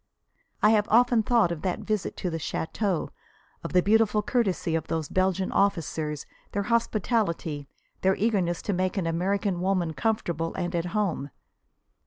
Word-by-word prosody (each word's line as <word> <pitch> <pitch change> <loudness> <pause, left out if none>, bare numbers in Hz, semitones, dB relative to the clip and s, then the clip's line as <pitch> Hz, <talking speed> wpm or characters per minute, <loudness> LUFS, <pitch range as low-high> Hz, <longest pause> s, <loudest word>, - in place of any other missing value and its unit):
I 210 - +7
have 210 -1 +3
often 240 0 +5
thought 225 -5 +3
of 165 -3 -4
that 185 -2 -2
visit 215 -3 -2
to 180 - -2
the 165 - -3
"château," 180 +3 -2 0.5
of - - -4
the 180 -1 +4
beautiful 215 0 +3
courtesy 200 -9 0
of 165 - -1
those 160 -2 -2
Belgian 185 0 0
officers, 160 -6 0 0.3
their 200 - 0
hospitality, 210 - 0 0.3
their 190 0 +3
eagerness 190 -6 0
to 205 - -1
make 185 +1 -1
an 185 - 0
American 185 +2 0
woman 180 -3 0
comfortable 170 -5 -1
and 175 -1 -2
at 170 -1 0
home. 170 -9 -1
190 Hz, 155 wpm, -27 LUFS, 170-210 Hz, 0.5 s, I